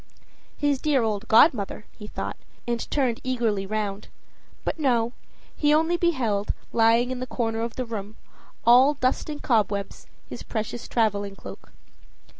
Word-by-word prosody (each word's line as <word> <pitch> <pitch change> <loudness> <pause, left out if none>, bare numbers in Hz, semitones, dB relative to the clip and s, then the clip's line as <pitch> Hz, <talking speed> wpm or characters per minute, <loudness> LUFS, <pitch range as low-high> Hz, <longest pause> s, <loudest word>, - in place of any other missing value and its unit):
His 285 -2 +1
dear 285 -5 +2
old 210 -2 -2
godmother, 220 -4 +4
he 210 - -11
thought, - - -5 0.3
and 235 -1 -2
turned 255 -5 0
eagerly 230 -6 -1
round. 210 -1 -3 0.6
But - - -3
no; 240 -5 +1 0.4
he 295 0 +3
only 325 +3 +2
beheld, 255 - 0 0.2
lying 230 +2 +4
in 255 -1 -4
a 255 - -3
corner 225 -2 -2
of 230 0 -3
the 255 - -3
room, 215 -2 -6 0.5
all 255 +5 +6
dust 255 +3 0
and 295 -1 -6
cobwebs, 205 -4 0 0.2
his - - -8
precious 225 +1 -4
traveling 205 -3 0
cloak. - - -11
235 Hz, 145 wpm, -25 LUFS, 215-260 Hz, 0.6 s, all